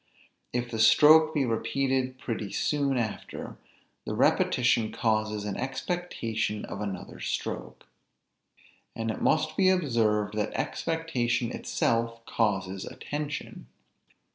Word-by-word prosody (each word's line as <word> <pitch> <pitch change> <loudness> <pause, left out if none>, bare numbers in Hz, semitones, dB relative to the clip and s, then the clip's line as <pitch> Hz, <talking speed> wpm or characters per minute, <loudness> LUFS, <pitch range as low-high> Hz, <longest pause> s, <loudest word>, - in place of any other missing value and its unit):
If 120 0 -2
the 110 - -3
stroke 155 +7 +7
be 145 -4 +1
repeated 130 +2 0
pretty 110 -5 -4
soon 140 -3 +1
after, 110 -3 -4 0.5
the - - -4
repetition 120 -3 +3
causes 110 -2 0
an 105 - -3
expectation 130 - -2
of - - -6
another 100 -2 -5
stroke. - - -4 1.1
And 115 0 -2
it - - -6
must 155 0 +2
be 190 -1 +4
observed, 115 - +1
that 105 0 -2
expectation 125 -7 -1
itself 115 -1 -1
causes 95 -4 0
a - - -8
tension. 150 +1 -5
120 Hz, 115 wpm, -28 LUFS, 110-145 Hz, 1.1 s, stroke